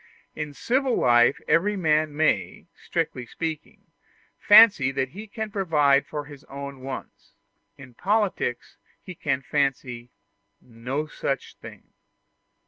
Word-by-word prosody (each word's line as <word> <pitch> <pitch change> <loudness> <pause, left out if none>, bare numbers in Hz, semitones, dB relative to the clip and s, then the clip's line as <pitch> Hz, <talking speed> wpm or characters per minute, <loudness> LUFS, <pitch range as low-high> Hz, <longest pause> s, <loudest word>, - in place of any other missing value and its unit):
In 150 -2 -6
civil 260 - 0
life 120 +2 +4
every 185 +7 +2
man 155 -3 +1
may, 205 +6 0
strictly 150 -8 -4
speaking, 160 +3 -6 0.6
fancy 205 - +7
that 135 -1 -2
he 210 +9 -10
can 220 0 -6
provide 150 -8 +2
for 150 -1 -5
his 145 -2 -13
own 140 0 -8
wants; 130 +1 -9 0.4
in 130 -2 -13
politics, 195 - -1 0.3
he 185 - -8
can 135 -5 -2
fancy 130 -4 -2 0.5
no 125 +6 -5
such 140 -3 -4
thing. - - -14
150 Hz, 120 wpm, -25 LUFS, 135-185 Hz, 0.6 s, fancy